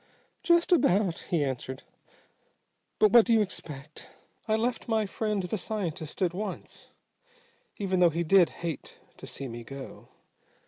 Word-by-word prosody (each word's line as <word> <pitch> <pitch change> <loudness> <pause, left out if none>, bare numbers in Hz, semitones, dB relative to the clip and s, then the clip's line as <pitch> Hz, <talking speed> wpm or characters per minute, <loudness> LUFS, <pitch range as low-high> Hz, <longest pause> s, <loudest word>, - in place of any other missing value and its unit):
"Just 340 -1 +3
about," 205 - +3
he 170 -6 +2
answered. 130 -1 -4 1.1
"But 215 -2 +4
what 235 0 +8
do 235 - +4
you 225 - +5
expect? 150 -6 -6 0.4
I 215 - +2
left 235 +2 -1
my 220 -2 +1
friend 210 0 -2
the 180 +3 -3
scientist 180 -6 -4
at 175 -2 +1
once, 200 +1 -6 0.9
even 190 -2 0
though 175 -1 +6
he 165 +2 -1
did 175 +1 +5 0.2
hate 165 -4 -5 0.2
to - - -10
see 135 - -6
me 120 -1 -7
go. 135 +3 -10
185 Hz, 145 wpm, -28 LUFS, 155-215 Hz, 1.1 s, what